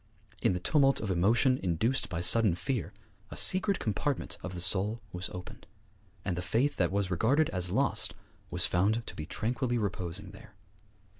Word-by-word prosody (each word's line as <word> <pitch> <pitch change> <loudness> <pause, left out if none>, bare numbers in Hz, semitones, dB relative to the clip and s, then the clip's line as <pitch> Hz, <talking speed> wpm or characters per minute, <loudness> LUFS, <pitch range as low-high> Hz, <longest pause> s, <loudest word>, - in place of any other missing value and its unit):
In - - +2
the 90 - -2
tumult 135 - +3
of 105 - -3
emotion 115 +9 +3
induced 100 +9 0
by 85 -4 -3
sudden 100 +1 +5
fear, 105 +7 -3 0.4
a - - -9
secret 190 +1 +4
compartment 125 +6 -3
of 90 0 -6
the - - -4
soul 100 +5 +2
was 90 +2 -4
opened, 90 0 -10 0.6
and 90 - -1
the 90 - -3
faith 120 +10 0
that 90 -2 +1
was 100 -1 -1
regarded 130 - +2
as 90 -1 +2
lost - - 0 0.3
was - - +1
found 105 +6 +1
to - - -8
be 75 - -6
tranquilly 120 +4 -1
reposing 95 -2 -4
there. 95 - -15
100 Hz, 170 wpm, -30 LUFS, 90-120 Hz, 0.6 s, sudden